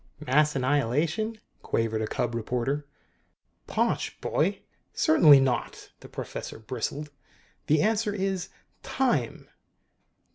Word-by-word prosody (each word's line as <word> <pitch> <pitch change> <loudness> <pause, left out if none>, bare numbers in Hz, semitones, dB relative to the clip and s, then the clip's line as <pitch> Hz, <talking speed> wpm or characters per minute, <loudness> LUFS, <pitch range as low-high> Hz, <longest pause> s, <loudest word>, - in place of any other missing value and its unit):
"Mass 150 +3 +3
annihilation?" 145 - 0 0.2
quavered 110 -1 -1
a 110 - -1
cub 120 +1 -2
reporter. 125 +5 -2 0.8
"Posh, - - -1
boy! - - 0 0.3
Certainly 155 -3 +6
not!" 130 -2 -2
The - - -13
professor - - -6
bristled. 130 +6 -4 0.6
"The 150 0 +3
answer 215 -1 +1
is 195 -2 -2 0.3
TIME!" 260 -2 -1
145 Hz, 100 wpm, -27 LUFS, 125-185 Hz, 0.8 s, Certainly